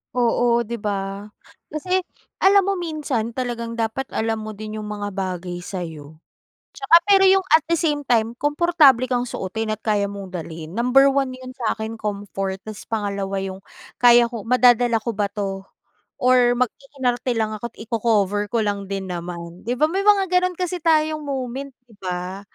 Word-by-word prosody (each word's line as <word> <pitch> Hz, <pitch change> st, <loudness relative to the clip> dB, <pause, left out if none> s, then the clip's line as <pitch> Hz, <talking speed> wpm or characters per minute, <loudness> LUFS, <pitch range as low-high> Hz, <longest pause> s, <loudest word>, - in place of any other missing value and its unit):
Oo 235 Hz, 0 st, +2 dB
di 235 Hz, +1 st, -5 dB
ba? 200 Hz, 0 st, -3 dB, 0.4 s
Kasi, 365 Hz, +5 st, -1 dB, 0.4 s
alam 395 Hz, 0 st, +5 dB
mo 395 Hz, +1 st, 0 dB
minsan 285 Hz, -9 st, -3 dB
talagang 235 Hz, -2 st, -3 dB
dapat 230 Hz, +3 st, -2 dB
alam 225 Hz, 0 st, 0 dB
mo 215 Hz, -1 st, -7 dB
din 215 Hz, +1 st, -6 dB
yung 210 Hz, -, -6 dB
mga 205 Hz, -1 st, -4 dB
bagay 180 Hz, -2 st, -4 dB
sayo. 160 Hz, -5 st, -7 dB, 0.6 s
Tsaka 405 Hz, -5 st, +4 dB
pero 395 Hz, -1 st, +5 dB
yung 385 Hz, 0 st, +5 dB
at 320 Hz, -, +7 dB
the 335 Hz, -, +3 dB
same 295 Hz, -2 st, 0 dB
time, 230 Hz, -1 st, +2 dB
komportable 295 Hz, -4 st, +4 dB
kang 245 Hz, -1 st, -1 dB
suotin 220 Hz, +3 st, -4 dB
at 215 Hz, -, -8 dB
kaya 205 Hz, -2 st, +1 dB
mong 195 Hz, -2 st, -8 dB
dalhin 165 Hz, -1 st, -7 dB
number 250 Hz, +4 st, +4 dB
one 270 Hz, -1 st, +1 dB
yun 255 Hz, 0 st, -10 dB
sakin 225 Hz, -2 st, -3 dB
comfort 200 Hz, -2 st, -3 dB
tas 215 Hz, -2 st, -8 dB
pangalawa 200 Hz, -3 st, -2 dB
yung 190 Hz, 0 st, -6 dB, 0.4 s
kaya 240 Hz, 0 st, +7 dB
ko, 235 Hz, -2 st, -5 dB
madadala 245 Hz, 0 st, +4 dB
ko 235 Hz, +2 st, -3 dB
ba 200 Hz, 0 st, -1 dB
to, 195 Hz, -2 st, -4 dB, 0.6 s
or 250 Hz, -1 st, +4 dB
mag-iinarte 255 Hz, -1 st, -1 dB
lang 215 Hz, -1 st, 0 dB
ako't 230 Hz, +2 st, -7 dB
i-cocover 210 Hz, -3 st, 0 dB
ko 230 Hz, -2 st, +1 dB
lang 200 Hz, -1 st, -3 dB
din 195 Hz, -1 st, -3 dB
naman 175 Hz, -1 st, -6 dB
di 245 Hz, +3 st, -3 dB
ba 305 Hz, -, +4 dB
may 375 Hz, +5 st, -1 dB
mga 405 Hz, -1 st, +4 dB
ganun 360 Hz, -1 st, +2 dB
kasi 360 Hz, -1 st, -3 dB
tayong 310 Hz, -1 st, +2 dB
moment 270 Hz, -1 st, -4 dB, 0.2 s
di 230 Hz, -, -21 dB
ba? 180 Hz, +1 st, -4 dB
230 Hz, 170 wpm, -22 LUFS, 200-265 Hz, 0.6 s, at